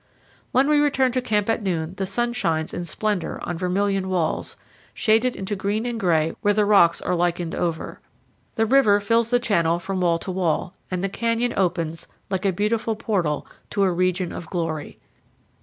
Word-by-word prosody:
When 265 Hz, +2 st, +3 dB
we 300 Hz, -1 st, +4 dB
return 270 Hz, -3 st, +2 dB
to 255 Hz, +1 st, 0 dB
camp 210 Hz, -4 st, 0 dB
at 225 Hz, 0 st, +1 dB
noon 170 Hz, -4 st, -2 dB
the 195 Hz, -, -2 dB
sun 240 Hz, +5 st, 0 dB
shines 160 Hz, -8 st, -1 dB
in 175 Hz, -, -4 dB
splendor 205 Hz, +2 st, -2 dB
on 175 Hz, -, -3 dB
vermilion 190 Hz, +2 st, 0 dB
walls, 175 Hz, -4 st, -1 dB, 0.4 s
shaded 225 Hz, +3 st, +2 dB
into 195 Hz, +2 st, -3 dB
green 205 Hz, +4 st, -1 dB
and 240 Hz, -2 st, -3 dB
gray 165 Hz, -5 st, +2 dB
where 205 Hz, 0 st, +2 dB
the 210 Hz, -1 st, +3 dB
rocks 175 Hz, -5 st, +5 dB
are -, -, 0 dB
lichened 175 Hz, -1 st, 0 dB
over; 165 Hz, -2 st, -3 dB, 0.6 s
the 225 Hz, -, +2 dB
river 220 Hz, -4 st, +5 dB
fills 230 Hz, +3 st, +2 dB
the 245 Hz, -, +4 dB
channel 170 Hz, -8 st, +1 dB
from 190 Hz, +1 st, -3 dB
wall 170 Hz, -2 st, +3 dB
to 185 Hz, -, -5 dB
wall, 180 Hz, -2 st, -1 dB, 0.2 s
and 185 Hz, 0 st, -2 dB
the -, -, +2 dB
canyon 230 Hz, +4 st, -1 dB
opens, 170 Hz, -3 st, -1 dB, 0.2 s
like 190 Hz, +1 st, 0 dB
a -, -, +3 dB
beautiful 215 Hz, +4 st, 0 dB
portal, 185 Hz, -10 st, -1 dB, 0.2 s
to 200 Hz, -, +1 dB
a 190 Hz, -, +3 dB
region 185 Hz, 0 st, 0 dB
of 165 Hz, -, -7 dB
glory. 165 Hz, -4 st, -3 dB
195 Hz, 185 wpm, -23 LUFS, 175-225 Hz, 0.6 s, rocks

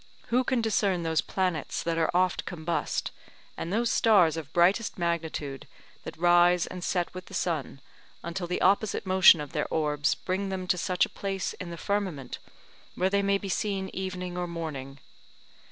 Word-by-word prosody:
Who 250 Hz, +2 st, +3 dB
can 255 Hz, -1 st, 0 dB
discern 200 Hz, -5 st, +1 dB
those 160 Hz, -1 st, +1 dB
planets 180 Hz, -5 st, -2 dB
that 165 Hz, -1 st, -1 dB
are 160 Hz, -, +2 dB
oft 180 Hz, 0 st, +1 dB
combust, 170 Hz, -1 st, -2 dB, 0.4 s
and 170 Hz, -, -5 dB
those 230 Hz, +3 st, +1 dB
stars 190 Hz, -9 st, +4 dB
of 160 Hz, -4 st, -6 dB
brightest 190 Hz, +6 st, +2 dB
magnitude 160 Hz, -5 st, -3 dB, 0.4 s
that -, -, -7 dB
rise 175 Hz, +1 st, +4 dB
and 180 Hz, -1 st, -7 dB
set 175 Hz, -2 st, -1 dB
with 185 Hz, 0 st, -8 dB
the -, -, -9 dB
sun, 150 Hz, -5 st, -2 dB, 0.4 s
until 175 Hz, +1 st, -4 dB
the 180 Hz, -, -2 dB
opposite 200 Hz, +2 st, +2 dB
motion 185 Hz, -3 st, +7 dB
of 150 Hz, -2 st, -6 dB
their 150 Hz, -, -1 dB
orbs 150 Hz, -2 st, +1 dB
bring 190 Hz, +2 st, -3 dB
them 190 Hz, -1 st, -3 dB
to 180 Hz, -, +3 dB
such 180 Hz, +1 st, +2 dB
a -, -, -12 dB
place 195 Hz, -1 st, -3 dB
in 180 Hz, -, -8 dB
the 170 Hz, -, -7 dB
firmament, 185 Hz, -10 st, -3 dB, 0.6 s
where 185 Hz, +1 st, +1 dB
they 200 Hz, 0 st, +3 dB
may 200 Hz, 0 st, +2 dB
be 195 Hz, -, -7 dB
seen 195 Hz, 0 st, -2 dB
evening 180 Hz, -1 st, -4 dB
or 175 Hz, -, -2 dB
morning? 150 Hz, -5 st, -6 dB
180 Hz, 175 wpm, -28 LUFS, 165-190 Hz, 0.6 s, motion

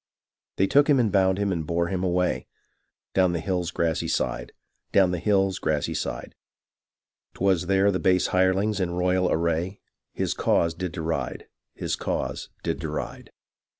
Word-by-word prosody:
They 95 Hz, -, +3 dB
took 145 Hz, +8 st, +4 dB
him 140 Hz, -3 st, +5 dB
and 115 Hz, -4 st, +2 dB
bound 95 Hz, -1 st, +3 dB
him 100 Hz, -1 st, 0 dB
and 85 Hz, -3 st, -1 dB
bore 85 Hz, +2 st, -1 dB
him 95 Hz, -2 st, -2 dB
away, 90 Hz, 0 st, 0 dB, 0.7 s
Down 95 Hz, -2 st, +3 dB
the 85 Hz, -, -1 dB
hilFs 90 Hz, 0 st, -2 dB
grassy 85 Hz, -2 st, 0 dB
side; -, -, -2 dB, 0.4 s
down 95 Hz, -2 st, +4 dB
the 90 Hz, -, -2 dB
hill's 95 Hz, 0 st, +2 dB
grassy 75 Hz, -2 st, -1 dB
side, -, -, -4 dB, 1.0 s
'Twas 90 Hz, -2 st, +1 dB
there 95 Hz, +1 st, +3 dB
the 90 Hz, -, -1 dB
base 90 Hz, -1 st, +2 dB
hirelings, 95 Hz, +3 st, +2 dB
in 90 Hz, -2 st, 0 dB
royal 90 Hz, 0 st, +1 dB
array, 85 Hz, +3 st, 0 dB, 0.3 s
His -, -, -1 dB
cause 85 Hz, -1 st, +1 dB
did 90 Hz, +1 st, -4 dB
deride; 80 Hz, 0 st, -3 dB, 0.3 s
his -, -, -2 dB
cause -, -, -3 dB
did -, -, -2 dB
deride. -, -, -5 dB
90 Hz, 155 wpm, -25 LUFS, 85-95 Hz, 1.0 s, him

